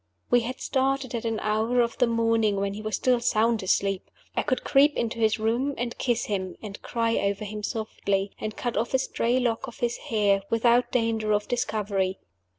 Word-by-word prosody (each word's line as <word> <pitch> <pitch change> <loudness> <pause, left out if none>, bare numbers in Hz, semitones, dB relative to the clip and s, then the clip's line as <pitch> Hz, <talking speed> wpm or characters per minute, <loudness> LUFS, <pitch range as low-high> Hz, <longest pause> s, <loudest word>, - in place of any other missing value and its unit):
We 245 - +6
had 245 +2 -4
started 270 -1 0
at 235 -1 -3
an 225 -1 -1
hour 220 +3 +1
of 235 +1 +1
the 245 - +4
morning 230 -2 +2
when 200 0 -1
he 210 - -6
was 215 -2 -2
still 250 +3 +2
sound 230 -1 +2
asleep. 195 0 0 0.3
I - - +2
could 255 - -1
creep 290 +2 +4
into 230 0 -2
his 220 0 +3
room, 235 +6 0
and 240 0 -3
kiss 240 -3 0
him, 190 -3 -3
and 205 -2 -8
cry 230 -1 0
over 200 +1 -1
him 210 +1 -5
softly, 200 -3 -2
and 215 0 -5
cut 240 -1 -2
off 240 +3 0
a - - +6
stray 250 -1 0
lock 245 +1 -1
of 240 - -10
his 240 0 -1
hair, 205 -3 +3
without 235 +2 +3
danger 225 -3 +1
of 210 0 0
discovery. 205 -5 -1
230 Hz, 200 wpm, -26 LUFS, 210-240 Hz, 0.3 s, We